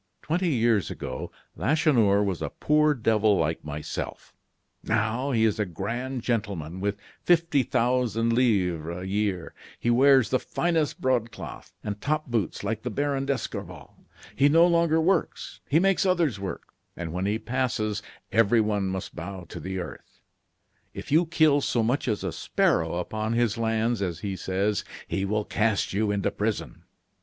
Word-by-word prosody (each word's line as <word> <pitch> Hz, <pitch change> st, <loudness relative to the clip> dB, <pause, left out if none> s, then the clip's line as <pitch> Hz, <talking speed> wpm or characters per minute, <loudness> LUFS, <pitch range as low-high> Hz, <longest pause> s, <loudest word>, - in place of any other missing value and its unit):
"Twenty 175 Hz, +3 st, 0 dB
years 115 Hz, -, +2 dB
ago, 65 Hz, -, -6 dB, 0.2 s
Lacheneur 120 Hz, -10 st, +3 dB
was 95 Hz, -4 st, -2 dB
a -, -, -2 dB
poor 150 Hz, 0 st, +2 dB
devil 110 Hz, -3 st, +3 dB
like 80 Hz, -1 st, -1 dB
myself; 75 Hz, 0 st, -6 dB, 0.5 s
now, 115 Hz, +4 st, 0 dB
he 115 Hz, -4 st, +3 dB
is 110 Hz, -1 st, +1 dB
a -, -, +3 dB
grand 120 Hz, +8 st, -4 dB
gentleman 100 Hz, -8 st, -2 dB
with 100 Hz, +1 st, -1 dB, 0.3 s
fifty 170 Hz, -4 st, +3 dB
thousand 120 Hz, -2 st, +1 dB
livres 90 Hz, -9 st, +1 dB
a 90 Hz, -, -6 dB
year. 95 Hz, -4 st, -1 dB, 0.3 s
He 120 Hz, -, +1 dB
wears 130 Hz, -2 st, +5 dB
the 130 Hz, -, +3 dB
finest 165 Hz, -4 st, -1 dB
broadcloth 115 Hz, -, -2 dB
and 105 Hz, -1 st, -4 dB
top 155 Hz, +2 st, 0 dB
boots 115 Hz, -7 st, -2 dB
like 110 Hz, +2 st, -2 dB
the 125 Hz, -, -3 dB
Baron 140 Hz, +2 st, -1 dB
d'Escorval. 140 Hz, -2 st, -4 dB, 0.4 s
He 140 Hz, +1 st, +4 dB
no 165 Hz, +3 st, +6 dB
longer 170 Hz, -2 st, +3 dB
works; 170 Hz, +1 st, 0 dB
he 145 Hz, -, +4 dB
makes 195 Hz, +1 st, +3 dB
others 170 Hz, -, +1 dB
work; 95 Hz, -1 st, -6 dB, 0.2 s
and 85 Hz, -2 st, -5 dB
when 90 Hz, +2 st, -1 dB
he 105 Hz, +2 st, +1 dB
passes, 110 Hz, -3 st, -1 dB, 0.3 s
everyone 105 Hz, -2 st, +3 dB
must 95 Hz, -1 st, -4 dB
bow 95 Hz, -2 st, -6 dB
to -, -, -7 dB
the 95 Hz, 0 st, -4 dB
earth. 90 Hz, -, -8 dB, 0.8 s
If -, -, -7 dB
you 165 Hz, +3 st, +4 dB
kill 155 Hz, -3 st, +4 dB
so 120 Hz, -3 st, +1 dB
much 125 Hz, +6 st, 0 dB
as 110 Hz, -3 st, -1 dB
a -, -, -2 dB
sparrow 80 Hz, 0 st, +1 dB
upon 110 Hz, +5 st, -2 dB
his 115 Hz, -2 st, +1 dB
lands, 115 Hz, -1 st, 0 dB
as 85 Hz, -3 st, -3 dB
he 100 Hz, -2 st, -3 dB
says, 100 Hz, +3 st, -1 dB, 0.2 s
he 95 Hz, -, -1 dB
will 105 Hz, +1 st, -1 dB
cast 110 Hz, -3 st, 0 dB
you 105 Hz, +2 st, +1 dB
into 100 Hz, -1 st, 0 dB
prison. 105 Hz, +1 st, -3 dB
110 Hz, 160 wpm, -26 LUFS, 100-135 Hz, 0.8 s, no